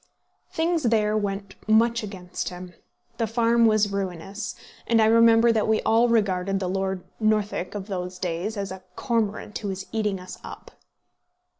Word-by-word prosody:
Things 330 Hz, +1 st, 0 dB
there 215 Hz, -4 st, +2 dB
went 200 Hz, -2 st, -2 dB
much 230 Hz, +2 st, +4 dB
against 190 Hz, -4 st, -5 dB
him; 180 Hz, 0 st, -9 dB, 0.4 s
the 230 Hz, -, 0 dB
farm 230 Hz, +1 st, +3 dB
was 215 Hz, -2 st, +3 dB
ruinous, 195 Hz, +2 st, -4 dB, 0.3 s
and 230 Hz, -1 st, +3 dB
I 220 Hz, -, +5 dB
remember 230 Hz, +1 st, +6 dB
that 220 Hz, -2 st, +1 dB
we 220 Hz, 0 st, +3 dB
all 230 Hz, +2 st, +4 dB
regarded 195 Hz, -4 st, +1 dB
the 185 Hz, -, -2 dB
Lord 190 Hz, 0 st, -2 dB, 0.2 s
Northwick 210 Hz, -4 st, 0 dB
of 200 Hz, -2 st, -4 dB
those 180 Hz, -2 st, -5 dB
days 185 Hz, +4 st, -3 dB
as 195 Hz, -1 st, -3 dB
a 190 Hz, 0 st, -7 dB
cormorant 215 Hz, -3 st, -2 dB
who 210 Hz, -, -5 dB
was 190 Hz, -1 st, -4 dB
eating 210 Hz, -3 st, -1 dB
us 180 Hz, 0 st, -10 dB
up. -, -, -10 dB
210 Hz, 160 wpm, -25 LUFS, 190-225 Hz, 0.4 s, remember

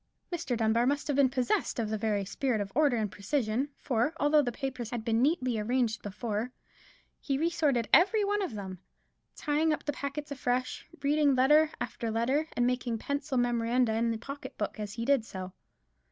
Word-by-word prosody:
Mr. 330 Hz, -8 st, -2 dB
Dunbar 230 Hz, +2 st, +2 dB
must 285 Hz, +1 st, 0 dB
have 290 Hz, -, +1 dB
been 275 Hz, -2 st, +4 dB
possessed 255 Hz, -2 st, 0 dB
of 220 Hz, -3 st, -1 dB
the -, -, 0 dB
very 210 Hz, -2 st, 0 dB
spirit 235 Hz, +3 st, -1 dB
of 200 Hz, -1 st, -3 dB
order 285 Hz, -3 st, +3 dB
and 215 Hz, -3 st, -1 dB
precision; 230 Hz, +4 st, -1 dB
for, 245 Hz, +6 st, 0 dB
although 295 Hz, +1 st, +4 dB
the 245 Hz, -4 st, -1 dB
papers 255 Hz, -2 st, -4 dB
had 235 Hz, -2 st, -4 dB
been 230 Hz, 0 st, +2 dB
neatly 255 Hz, -5 st, +1 dB
arranged 230 Hz, 0 st, 0 dB
before, 215 Hz, +3 st, -3 dB, 0.7 s
he 275 Hz, -3 st, -1 dB
re 330 Hz, +4 st, +1 dB
sorted 275 Hz, -9 st, +1 dB
every 395 Hz, +8 st, +6 dB
one 410 Hz, +1 st, 0 dB
of 360 Hz, -, -3 dB
them; 190 Hz, -3 st, -6 dB, 0.6 s
tying 305 Hz, +1 st, +1 dB
up 305 Hz, -, -2 dB
the 290 Hz, -, -1 dB
packets 285 Hz, +1 st, -5 dB
afresh, 255 Hz, -2 st, -2 dB, 0.2 s
reading 290 Hz, -1 st, +3 dB
letter 300 Hz, +4 st, +5 dB
after 230 Hz, -1 st, -3 dB
letter, 255 Hz, +8 st, +1 dB
and 245 Hz, -, +3 dB
making 245 Hz, -2 st, 0 dB
pencil 280 Hz, +2 st, -2 dB
memoranda 240 Hz, -1 st, +2 dB
in 230 Hz, +1 st, +1 dB
his 225 Hz, -, -3 dB
pocket 275 Hz, +4 st, -8 dB
book 210 Hz, +1 st, -3 dB
as 210 Hz, -1 st, -4 dB
he 230 Hz, +1 st, -4 dB
did 275 Hz, -3 st, +3 dB
so. 185 Hz, -4 st, -7 dB
250 Hz, 190 wpm, -30 LUFS, 225-285 Hz, 0.7 s, every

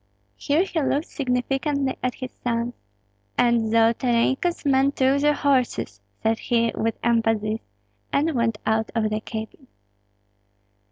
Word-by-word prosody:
Here 305 Hz, +4 st, +1 dB
he 350 Hz, -4 st, -2 dB
looked 285 Hz, +3 st, 0 dB
significantly 270 Hz, +1 st, -1 dB
at 255 Hz, 0 st, -1 dB
his 255 Hz, -1 st, -6 dB
sons. 235 Hz, 0 st, -2 dB, 0.6 s
"And 235 Hz, -2 st, +3 dB
Zolotarenko's 235 Hz, +8 st, +2 dB
men 275 Hz, 0 st, +3 dB
took 270 Hz, +1 st, +2 dB
the 295 Hz, 0 st, +3 dB
horses," 270 Hz, -4 st, 0 dB, 0.2 s
said 225 Hz, 0 st, +1 dB
he, 230 Hz, -1 st, +1 dB
with 225 Hz, 0 st, -1 dB
emphasis; 225 Hz, -2 st, +1 dB, 0.5 s
and 310 Hz, +3 st, +1 dB
went 235 Hz, -4 st, 0 dB
out 220 Hz, 0 st, +1 dB
of 215 Hz, -2 st, +1 dB
the 215 Hz, -, 0 dB
cabin. 220 Hz, +5 st, -7 dB
245 Hz, 125 wpm, -24 LUFS, 225-275 Hz, 0.6 s, And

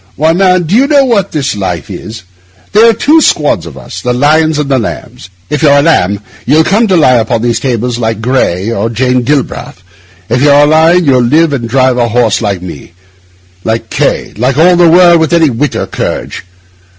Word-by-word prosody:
Why, 160 Hz, +2 st, +1 dB
man, 185 Hz, 0 st, +2 dB
do 170 Hz, +5 st, -2 dB
you 265 Hz, +4 st, +3 dB
know 285 Hz, -2 st, +3 dB
what 205 Hz, -6 st, 0 dB
this 145 Hz, -8 st, -2 dB
life 90 Hz, -6 st, -4 dB
is? 110 Hz, -2 st, -9 dB, 0.5 s
There 220 Hz, +3 st, +4 dB
are -, -, +3 dB
two 300 Hz, +8 st, +2 dB
squads 145 Hz, -, 0 dB
of 70 Hz, -5 st, -11 dB
us—the 95 Hz, -, -5 dB
lions 155 Hz, +4 st, +1 dB
and 150 Hz, -1 st, -2 dB
the 135 Hz, -2 st, 0 dB
lambs. 85 Hz, -, -7 dB, 0.2 s
If 150 Hz, 0 st, -3 dB
you're 145 Hz, -2 st, +4 dB
a 140 Hz, -, +2 dB
lamb, 100 Hz, -, +1 dB, 0.2 s
you'll 150 Hz, +5 st, +2 dB
come 215 Hz, +7 st, +1 dB
to 185 Hz, -3 st, +1 dB
lie 130 Hz, -6 st, +3 dB
upon 110 Hz, 0 st, -2 dB
these 120 Hz, -1 st, -1 dB
tables 120 Hz, -2 st, -3 dB
like 110 Hz, -2 st, -2 dB
Gray 110 Hz, -5 st, -1 dB
or 115 Hz, 0 st, -2 dB
Jane 125 Hz, +2 st, 0 dB
Galbraith; 130 Hz, -8 st, -3 dB, 0.4 s
if 120 Hz, +3 st, -1 dB
you're 145 Hz, 0 st, +4 dB
a 145 Hz, +1 st, +5 dB
lion, 160 Hz, +3 st, +3 dB
you'll 130 Hz, -3 st, +2 dB
live 150 Hz, +6 st, +1 dB
and 120 Hz, -4 st, -4 dB
drive 130 Hz, 0 st, +1 dB
a 120 Hz, -1 st, +1 dB
horse 120 Hz, 0 st, 0 dB
like 100 Hz, -5 st, -3 dB
me, 85 Hz, -2 st, -10 dB, 0.7 s
like 110 Hz, +1 st, -3 dB
K—, -, -, -2 dB
like 125 Hz, +4 st, -1 dB
all 175 Hz, +3 st, +4 dB
the 175 Hz, -1 st, +4 dB
world 175 Hz, 0 st, +5 dB
with 160 Hz, +1 st, -1 dB
any 165 Hz, -4 st, +2 dB
wit 135 Hz, +5 st, -2 dB
or -, -, -2 dB
courage. -, -, -5 dB
135 Hz, 205 wpm, -9 LUFS, 115-165 Hz, 0.7 s, a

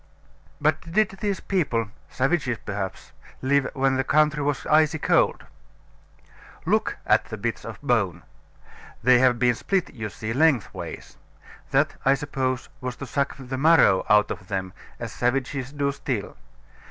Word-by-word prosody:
But 155 Hz, +2 st, 0 dB
did 215 Hz, +1 st, +3 dB
these 200 Hz, -2 st, -1 dB
people 120 Hz, -, -1 dB, 0.2 s
(savages 130 Hz, -3 st, 0 dB
perhaps) 95 Hz, -2 st, -5 dB, 0.3 s
live 140 Hz, +1 st, +2 dB
when 135 Hz, -1 st, +2 dB
the 135 Hz, -, +1 dB
country 150 Hz, +2 st, +2 dB
was 145 Hz, -1 st, -1 dB
icy 155 Hz, +1 st, +3 dB
cold? -, -, +2 dB, 1.2 s
Look -, -, +1 dB
at -, -, +3 dB
the -, -, -7 dB
bits -, -, -3 dB
of -, -, -8 dB
bone. -, -, 0 dB, 0.8 s
They 125 Hz, +1 st, +6 dB
have 125 Hz, -1 st, +4 dB
been 125 Hz, 0 st, +3 dB
split, 185 Hz, -, -1 dB
you 110 Hz, -5 st, -5 dB
see, 110 Hz, +2 st, -5 dB
lengthways; 140 Hz, -4 st, 0 dB, 0.5 s
that, -, -, +1 dB
I 135 Hz, +1 st, +4 dB
suppose, 130 Hz, -3 st, -2 dB
was 125 Hz, -1 st, -4 dB
to 135 Hz, -, -7 dB
suck 140 Hz, +1 st, -1 dB
the 130 Hz, -1 st, -5 dB
marrow 150 Hz, -, +5 dB
out 105 Hz, 0 st, +4 dB
of 95 Hz, -, -7 dB
them, 95 Hz, -2 st, -3 dB, 0.3 s
as -, -, -6 dB
savages 130 Hz, +1 st, -1 dB
do 140 Hz, -1 st, 0 dB
still. 130 Hz, -6 st, -4 dB
135 Hz, 145 wpm, -24 LUFS, 120-150 Hz, 1.2 s, They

